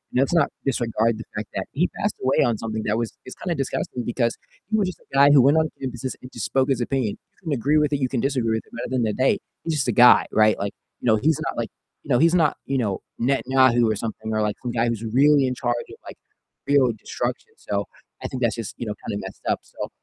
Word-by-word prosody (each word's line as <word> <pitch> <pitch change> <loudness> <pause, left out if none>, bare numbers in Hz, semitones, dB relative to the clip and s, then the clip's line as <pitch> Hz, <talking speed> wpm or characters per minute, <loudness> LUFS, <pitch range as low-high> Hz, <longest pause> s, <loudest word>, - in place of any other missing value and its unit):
let's 135 +6 +2
not 165 -5 +4 0.2
disregard 115 -3 +1
the 115 - -7
fact 105 -1 -4
that 95 - -2
he 170 +6 +2
passed 205 - 0
away 130 +1 +3
on 115 -3 +1
something 110 -1 -4
that 105 +1 +1
was 115 -1 -2
is 130 - -9
kinda 175 -2 -3
disgusting, 130 -3 -3
because 120 -1 0 0.3
he 220 - +2
was 200 -3 +2
just 185 - -6
a - - -25
guy 140 +1 +7
who 140 - +7
went 140 +5 +5
on 160 0 +3
campuses 130 0 -4
and 125 - -11
just - - -4
spoke 135 0 +1
his 130 -3 +1
opinion. 120 -3 -1
You - - -45
can 160 - -3
agree 140 +5 +2
with 150 -1 +2
it, 145 - 0
you 130 - +1
can 125 -2 -2
disagree 130 -5 0
with 110 - -4
it, - - -25
but 120 - -6
at - - -6
the 130 - 0
end 120 - +1
of 105 - -2
the - - -2
day, - - +3 0.3
he's 165 - 0
just 135 -4 0
a - - +3
guy, 120 +2 +7
right? 110 0 +4
Like, 100 0 -2 0.3
you - - -3
know, 110 -1 +5
he's 150 +5 +2
not, - - -6
like, - - -2 0.3
you - - -16
know, 120 - +4
he's 165 +2 +4
not, 155 -4 +3
you 135 - -1
know, 105 -6 -1 0.2
Netanyahu 130 -2 +3
or 110 - 0
something, 110 0 -5
or, 110 - +1
like, 105 -1 0
some 120 - -2
guy 120 0 +1
who's 115 -1 -2
really 135 +4 +4
in 130 - -1
charge 120 -2 -1
of, - - -10
like, - - -8 0.5
real 140 -3 +4
destruction. - - -4
So 100 0 -2 0.4
I - - -1
think 130 - -5
that's 115 -4 +1
just, 115 -4 -5
you 120 - -4
know, 105 - -2
kind - - -3
of - - -3
messed - - -9
up, - - +1
So, - - -7
125 Hz, 275 wpm, -23 LUFS, 115-140 Hz, 0.5 s, guy